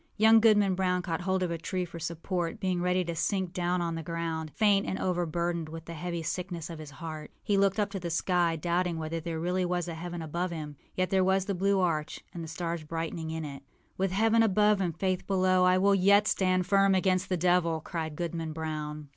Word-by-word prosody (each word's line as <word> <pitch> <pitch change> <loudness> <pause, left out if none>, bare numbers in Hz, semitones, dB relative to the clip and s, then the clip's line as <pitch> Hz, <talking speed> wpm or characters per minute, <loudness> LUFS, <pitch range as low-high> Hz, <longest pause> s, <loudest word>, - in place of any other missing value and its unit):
Young 220 +1 +7
Goodman 210 -3 +4
Brown 180 -1 0
caught 165 0 -2
hold 190 +1 0
of 175 - -1
a 165 - -3
tree 180 +2 -2
for 170 -1 -9
support, 170 +1 -3
being 185 -2 0
ready 180 0 +1
to 170 - -3
sink 190 +1 -1
down 180 -1 0
on 170 -1 -2
the 165 - -3
ground, 165 -1 -3
faint 205 -2 +3
and 190 - -2
overburdened 170 -2 -1
with 165 0 -8
the 170 - -7
heavy 170 +1 -4
sickness 175 -1 -4
of 165 - -8
his 155 -2 -8
heart. 155 +1 -7
He 205 - +1
looked 195 +1 +2
up 205 -1 0
to 195 - -4
the 175 -1 -4
sky, 170 0 +1
doubting 175 +1 0
whether 160 +1 -3
there 165 0 -4
really 180 +2 0
was 175 0 -1
a 170 - -4
heaven 170 +1 -5
above 170 +4 -2
him. 155 -3 -6 0.2
Yet 185 0 0
there 190 -1 +4
was 190 0 +2
the 200 - -1
blue 195 +1 +2
arch, 160 -4 -1
and 170 - -6
the - - -6
stars 165 0 -4
brightening 165 +1 -4
in 160 -1 -4
it. 140 -2 -7 0.4
âWith 195 0 +2
heaven 225 +4 +3
above 210 -1 +3
and 170 -4 -2
Faith 185 -1 -1
below, 185 -1 +3
I 185 0 +5
will 200 +2 +4
yet 200 +2 +5
stand 185 -1 +2
firm 195 0 +4
against 185 0 +1
the 185 - +1
devil!â 170 -2 +2
cried 160 -3 -4
Goodman 165 -1 -3
Brown. 150 -1 -5
175 Hz, 225 wpm, -29 LUFS, 165-190 Hz, 0.4 s, Young